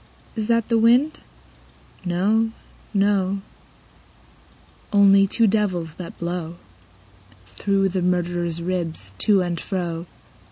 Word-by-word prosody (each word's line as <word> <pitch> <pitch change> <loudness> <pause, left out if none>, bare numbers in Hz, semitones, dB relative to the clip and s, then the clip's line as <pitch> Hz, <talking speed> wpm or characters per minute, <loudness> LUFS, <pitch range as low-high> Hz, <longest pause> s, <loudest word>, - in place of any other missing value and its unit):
Is 220 -2 -2
that 230 -1 +2
the 230 -1 +2
wind? 245 +7 +4 0.8
No, 200 +6 +1 0.4
no; 195 -1 +1 1.5
Only 195 -1 +6
two 230 +4 +2
devils, 190 -6 0
that 180 - -8
blow 170 -1 -4 0.9
Through 195 - 0
the 185 0 -2
murderer's 175 -1 -1
ribs 165 - -3
to 200 -3 +3
and 175 -2 -3
fro. 170 -2 -4
185 Hz, 105 wpm, -22 LUFS, 175-205 Hz, 1.5 s, Only